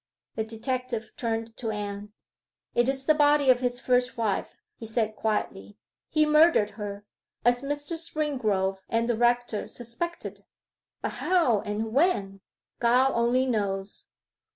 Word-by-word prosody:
The 220 Hz, -, -2 dB
detective 230 Hz, +1 st, -3 dB
turned 225 Hz, -1 st, -3 dB
to 230 Hz, -, -3 dB
Anne. 205 Hz, -1 st, -5 dB, 0.6 s
'It 240 Hz, +2 st, +2 dB
is 270 Hz, 0 st, -2 dB
the 310 Hz, -, +5 dB
body 290 Hz, -2 st, +5 dB
of 250 Hz, -, +2 dB
his 245 Hz, -1 st, -1 dB
first 250 Hz, 0 st, +1 dB
wife,' 215 Hz, -4 st, -1 dB, 0.2 s
he 225 Hz, -, -8 dB
said 220 Hz, -1 st, -1 dB
quietly. 105 Hz, -, -3 dB, 0.3 s
'He 310 Hz, -1 st, +3 dB
murdered 305 Hz, -8 st, +5 dB
her, 205 Hz, -1 st, -7 dB, 0.4 s
as 245 Hz, 0 st, +4 dB
Mr. 290 Hz, +3 st, -2 dB
Springrove 250 Hz, -, 0 dB
and 230 Hz, +1 st, +1 dB
the 240 Hz, -, +1 dB
rector 240 Hz, -1 st, +1 dB
suspected 245 Hz, +9 st, -5 dB, 0.6 s
but -, -, 0 dB
how 330 Hz, -, +3 dB
and 220 Hz, +2 st, -3 dB
when, 205 Hz, -, +1 dB, 0.4 s
God 250 Hz, +3 st, +4 dB
only 240 Hz, +2 st, +2 dB
knows. 200 Hz, -5 st, -2 dB
235 Hz, 135 wpm, -27 LUFS, 215-265 Hz, 0.6 s, the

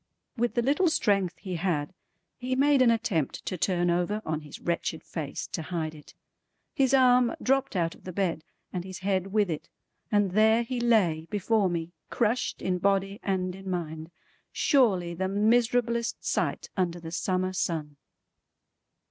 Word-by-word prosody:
With 240 Hz, -1 st, -1 dB
the 240 Hz, -, +2 dB
little 295 Hz, +8 st, +3 dB
strength 195 Hz, -, +1 dB
he 180 Hz, 0 st, -5 dB
had, 165 Hz, -3 st, -1 dB, 0.5 s
he 255 Hz, 0 st, -1 dB
made 280 Hz, 0 st, +4 dB
an 250 Hz, -, +6 dB
attempt 215 Hz, -, 0 dB
to -, -, -2 dB
turn 175 Hz, 0 st, +1 dB
over 180 Hz, +5 st, 0 dB
on 155 Hz, 0 st, -2 dB
his 150 Hz, -, -10 dB
wretched 170 Hz, -1 st, -2 dB
face 150 Hz, -4 st, -5 dB
to -, -, -3 dB
hide 160 Hz, -2 st, -3 dB
it. 150 Hz, -1 st, -15 dB, 0.6 s
His 270 Hz, -4 st, +2 dB
arm 250 Hz, -2 st, +5 dB
dropped 270 Hz, -2 st, +1 dB
out 165 Hz, -2 st, 0 dB
of -, -, -19 dB
the 185 Hz, -, -6 dB
bed 175 Hz, -4 st, -1 dB, 0.3 s
and 180 Hz, -2 st, -3 dB
his 185 Hz, 0 st, -7 dB
head 190 Hz, -2 st, +1 dB
with 205 Hz, +1 st, +2 dB
it, 155 Hz, -, -5 dB, 0.4 s
and 205 Hz, -3 st, +2 dB
there 220 Hz, +3 st, +4 dB
he 245 Hz, +1 st, -3 dB
lay 190 Hz, -10 st, +2 dB
before 205 Hz, 0 st, +1 dB
me 170 Hz, -1 st, -3 dB, 0.2 s
crushed 235 Hz, +1 st, 0 dB
in 180 Hz, -1 st, 0 dB
body 195 Hz, +1 st, +1 dB
and 185 Hz, -2 st, -1 dB
in 190 Hz, +1 st, -8 dB
mind. 160 Hz, -3 st, -4 dB, 0.4 s
Surely 195 Hz, -, +2 dB
the 190 Hz, +2 st, -2 dB
miserablest 235 Hz, +3 st, +1 dB
sight -, -, -1 dB
under 175 Hz, -2 st, -1 dB
the 165 Hz, -1 st, -8 dB
summer 185 Hz, +1 st, -1 dB
sun! 160 Hz, -5 st, -2 dB
190 Hz, 165 wpm, -28 LUFS, 170-235 Hz, 0.6 s, an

